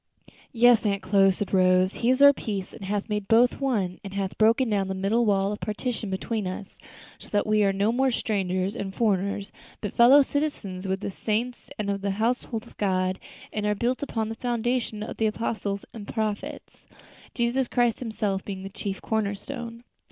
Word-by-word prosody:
"Yes, 240 -1 +5
Aunt 200 -2 0
Chloe," 195 0 +4
said 195 +2 -2
Rose, 185 0 +4
"He 235 - 0
is 260 +2 +4
our 285 0 +9
peace, 200 -7 -4
and - - -10
hath 200 +1 -2
made 210 -2 -2
both 240 +5 +4
one, 205 -10 0
and 195 -1 -8
hath 195 -1 -2
broken 230 +4 +4
down 200 -3 0
the 190 - -3
middle 210 +5 +1
wall 195 -1 +2
of 210 - -4
partition 220 0 -3
between 205 +2 -2
us; 185 +2 -7 0.4
so - - -12
that 205 - +1
we 215 0 +3
are 195 - +3
no 200 +3 +1
more 265 +3 +2
strangers 195 -4 -1
and 195 -4 -5
foreigners, 200 -2 0 0.3
but 205 - -4
fellow 265 +5 +7
citizens 220 -11 -3
with 190 +1 -1
the 200 - -3
saints 230 +5 -3
and 205 -2 -1
of 200 0 -3
the 200 - -1
household 230 0 -1
of - - -17
God; 185 -2 0 0.3
and 210 -1 -1
are 210 - +1
built 240 +5 -1
upon 225 -6 -2
the - - -3
foundation 240 -2 -1
of - - -7
the 220 - +2
apostles 215 -2 -3
and 210 -3 -8
prophets, 215 -2 -4 0.5
Jesus 240 +2 +1
Christ 240 -3 +1
himself 210 -5 -2
being 190 -2 -6
the 195 - -6
chief 195 0 -5
corner 215 -2 0
stone." 235 +1 -7
210 Hz, 195 wpm, -26 LUFS, 195-235 Hz, 0.5 s, our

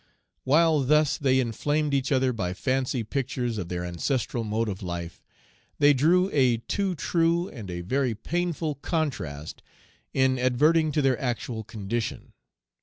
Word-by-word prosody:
While 155 +3 +4
thus 150 +2 +3
they 130 -2 +3
inflamed 145 +5 0
each 135 0 0
other 130 -1 +2
by 90 -5 -3
fancy 130 +1 -1
pictures 120 -1 -2
of 90 -3 -5
their 90 0 -3
ancestral 115 - -2
mode 110 +1 -1
of 100 -2 -4
life, 85 -2 -5 0.6
they 145 0 +6
drew 170 +7 +3
a 130 -5 +3
too 185 - -2
true 170 +2 +1
and 110 -8 -9
a 85 0 -4
very 125 +5 0
painful 165 +4 -2
contrast 80 - -3 0.5
in 130 -1 +2
adverting 150 +6 +3
to 150 - +1
their 130 -2 +2
actual 120 -3 -3
condition. 110 +1 -4
130 Hz, 145 wpm, -26 LUFS, 110-150 Hz, 0.6 s, they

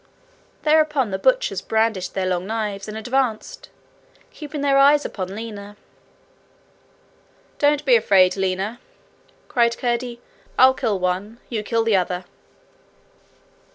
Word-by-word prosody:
Thereupon 300 -6 +2
the 190 - -2
butchers - - +1
brandished 220 -4 -1
their 190 -1 -1
long 180 0 -2
knives 210 -3 -3
and 215 0 -6
advanced, 245 0 -2 0.6
keeping 300 -1 -7
their 275 -1 +3
eyes 290 +1 +5
upon 190 -1 -5
Lina. 205 -2 -8 1.8
'Don't 295 0 +2
be 255 -3 +5
afraid, 190 -5 +4
Lina,' 195 +4 -2 0.7
cried 235 -1 +1
Curdie. 240 0 -2 0.4
'I'll 260 +1 +7
kill 220 -5 -1
one 185 +5 -3
you 225 -3 -2
kill 225 +2 0
the 225 -3 +3
other.' 180 0 -2
225 Hz, 120 wpm, -21 LUFS, 195-260 Hz, 1.8 s, I'll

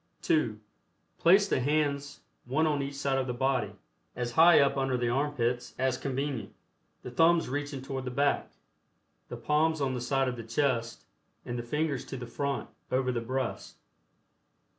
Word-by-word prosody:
(2) 120 -9 +1 0.6
Place 195 +4 +5
the - - +1
hands 140 0 -1 0.2
one 140 +6 +1
on 150 -2 +1
each 140 0 -4
side 135 -1 0
of 130 - -2
the 125 - -2
body, 135 +1 0 0.4
as 120 -1 -3
high 165 +7 +7
up 140 -1 +3
under 135 -2 0
the 120 -1 0
armpits 125 -2 -1
as 130 0 +1
convenient, 135 -1 -3 0.5
the 125 - -7
thumbs 165 +5 +4
reaching 145 0 -4
toward 135 -1 -4
the - - -2
back, 140 +3 +1 0.8
the - - -6
palms 155 +1 +1
on 135 -2 0
the 125 - -3
side 135 +1 +1
of 125 -1 -3
the 115 - -6
chest 115 0 -1 0.4
and 120 - -4
the - - -1
fingers 150 +3 -1
to 135 - -6
the 125 - -6
front 140 +3 -3 0.2
over 130 0 +1
the 120 -1 -2
breast. 130 +2 -3
135 Hz, 170 wpm, -29 LUFS, 125-145 Hz, 0.8 s, high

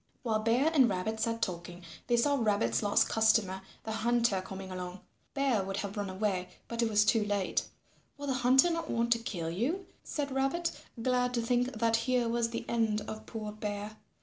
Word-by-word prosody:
While 220 -3 +1
Bear 240 +8 +2
and 265 -6 +6
Rabbit 205 +4 -2
sat 230 +1 0
talking, 175 0 -4 0.2
they 240 - +3
saw 285 +5 +3
Rabbit's 200 - +1
last 205 - +3
customer, 220 -4 +2 0.2
the 220 - -4
Hunter, 230 -2 +2
coming 190 0 -8
along. 180 0 -6 0.3
Bear 270 -7 +2
would 195 +1 -4
have 200 0 -4
run 205 -2 -2
away, 185 -1 -1 0.2
but 235 0 -2
it 230 - +2
was 210 0 +4
too 225 0 +3
late. 205 -2 0 0.5
"Will 285 - -6
the 270 - 0
Hunter 260 +6 +5
not 330 -1 -3
want 235 0 0
to 230 - -3
kill 175 -8 -4
you?" 290 - -1 0.2
said 285 -2 -3
Rabbit, 275 +6 0 0.3
glad 250 0 +1
to 235 - +1
think 245 +2 +1
that 230 +1 +2
here 245 0 +1
was 230 0 +1
the 230 - -4
end 220 -2 +1
of 215 +1 -7
poor 215 -2 -5
Bear. 210 0 -5
225 Hz, 195 wpm, -31 LUFS, 200-245 Hz, 0.5 s, and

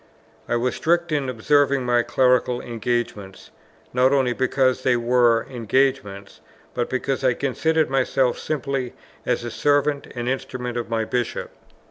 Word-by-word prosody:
I - - +1
was 125 +1 0
strict 170 0 +1
in 140 -3 0
observing 140 +2 +2
my 120 -1 +3
clerical 125 0 +2
engagements, 115 -5 -4 0.4
not 125 +1 +3
only 130 -3 +2
because 130 0 +1
they 125 -1 +2
were 120 -1 +3
engagements, 120 -5 -1 0.3
but 120 -1 -2
because 135 +1 -2
I 125 -2 +3
considered 155 +4 0
myself 130 -1 +1
simply 135 -4 -3 0.3
as 125 -1 0
the 120 - -5
servant 145 +1 +1
and 120 0 -4
instrument 125 -2 -3
of 120 -1 -4
my 115 -1 -1
Bishop. 120 +1 -3
125 Hz, 140 wpm, -22 LUFS, 120-135 Hz, 0.4 s, my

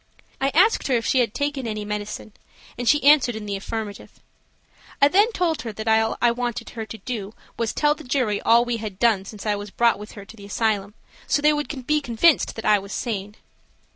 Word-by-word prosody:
I 270 - +2
asked 400 +7 +4
her 260 - +2
if 230 - -1
she 260 - +2
had 235 -4 +2
taken 285 -3 -2
any 215 -1 -4
medicine, 210 0 -5 0.4
and 240 0 -1
she 295 +2 +3
answered 280 -5 +5
in 215 -1 -6
the 200 -1 -3
affirmative. 210 +1 -6 0.8
I 280 - +7
then 410 +8 +4
told 340 - -1
her 225 -1 -5
that 220 +2 -7
all 220 0 +2
I 240 - +4
wanted 240 0 -4
her 225 -2 -6
to 225 - -8
do 220 -4 -6 0.2
was 230 -2 -1
tell 295 0 +2
the 310 +1 -12
jury 245 -6 0
all 235 +1 +4
we 240 -1 -1
had 215 -4 -6
done 215 -4 +2
since 210 +1 -10
I 210 -1 +1
was 205 0 -7
brought 235 +1 +2
with 210 - -10
her 200 -2 -10
to 220 - -13
the 200 -2 -12
asylum, 205 -1 -1 0.3
so - - +2
they 300 +1 +4
would 295 -3 -4
be 300 +2 +2
convinced 275 +5 +2
that 225 - -7
I 210 -1 +5
was 200 +1 -9
sane. 205 -3 -4
230 Hz, 225 wpm, -23 LUFS, 210-270 Hz, 0.8 s, I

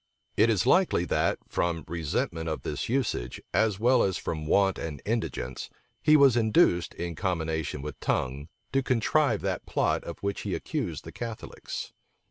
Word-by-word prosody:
It 110 +2 +4
is 100 -5 +2
likely 180 - +3
that, - - +1
from 85 -2 -1
resentment 80 0 -2
of 80 - -4
this - - -3
usage, 120 - -1
as 110 -3 +2
well 125 +2 +4
as 95 -2 +1
from 75 -2 -4
want 95 +2 +3
and 75 -4 -5
indigence, 105 - -3 0.3
he 155 0 +6
was 140 -4 +6
induced, 110 -6 +3
in 85 -1 -4
combination 80 -4 -2
with 75 -1 -6
Tongue, 70 +3 -1 0.3
to 135 - +3
contrive 135 +4 +2
that - - -3
plot - - +1
of - - -7
which 100 0 -2
he - - -2
accused - - -3
the - - -9
Catholics. 115 -2 -6
95 Hz, 160 wpm, -28 LUFS, 80-115 Hz, 0.3 s, he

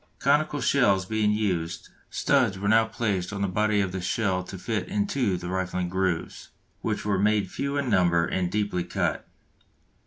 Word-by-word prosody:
Conical 150 +1 +1
shells 100 -9 +3
being 110 +1 +1
used, 90 -6 -2 0.2
studs 95 - +2
were 100 +2 -3
now 110 +1 +5
placed 105 -5 -2
on 100 -1 -3
the - - +1
body 105 +2 +1
of 95 -2 -1
the 95 0 -4
shell 95 0 0
to 95 - -8
fit 110 +3 -3
into 180 - 0
the 90 0 -7
rifling 90 -1 -2
grooves, 90 -2 -2 0.3
which - - -2
were 100 -2 +1
made 105 -2 +2
few 140 +1 -2
in 140 -2 -1
number 90 -6 +3
and 90 -1 -1
deeply 105 -4 -1
cut. - - -2
100 Hz, 175 wpm, -26 LUFS, 90-110 Hz, 0.3 s, now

